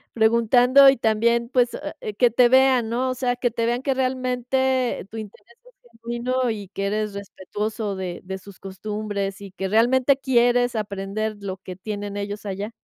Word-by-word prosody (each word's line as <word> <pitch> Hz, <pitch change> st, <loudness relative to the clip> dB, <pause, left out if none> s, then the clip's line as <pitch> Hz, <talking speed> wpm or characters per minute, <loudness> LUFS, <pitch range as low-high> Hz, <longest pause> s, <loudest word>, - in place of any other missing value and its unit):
Preguntando 245 Hz, +4 st, +5 dB
y 270 Hz, -, -2 dB
también, 235 Hz, +1 st, +1 dB
pues, 250 Hz, -2 st, +2 dB
ah, 300 Hz, +1 st, -6 dB
eh, 215 Hz, -, -5 dB
que 245 Hz, +4 st, +3 dB
te 240 Hz, +2 st, +4 dB
vean, 260 Hz, -2 st, +4 dB
¿no? 255 Hz, +3 st, -1 dB
O 255 Hz, -, -2 dB
sea 250 Hz, -1 st, -1 dB
que 245 Hz, 0 st, 0 dB
te 230 Hz, 0 st, -2 dB
vean 240 Hz, +2 st, 0 dB
que 270 Hz, -1 st, 0 dB
realmente 255 Hz, -2 st, -1 dB
tu 225 Hz, -, -9 dB
interés 215 Hz, +2 st, -11 dB
es 240 Hz, -, -23 dB
genuino 240 Hz, +1 st, -1 dB
y 205 Hz, -3 st, -6 dB
que 195 Hz, +1 st, -4 dB
eres 210 Hz, 0 st, -2 dB
respetuoso 205 Hz, +2 st, -4 dB
de 185 Hz, -2 st, -5 dB
de 190 Hz, +1 st, -5 dB
sus 195 Hz, 0 st, -15 dB
costumbres 200 Hz, 0 st, -5 dB
y 200 Hz, -, -8 dB
que 190 Hz, +1 st, -4 dB
realmente 245 Hz, +6 st, +3 dB
quieres 245 Hz, -2 st, +2 dB
aprender 210 Hz, +1 st, -3 dB
lo 190 Hz, -1 st, -5 dB
que 185 Hz, -1 st, -9 dB
tienen 205 Hz, +1 st, -6 dB
ellos 205 Hz, +1 st, -5 dB
allá. 205 Hz, +3 st, -5 dB
230 Hz, 180 wpm, -23 LUFS, 205-250 Hz, -, Preguntando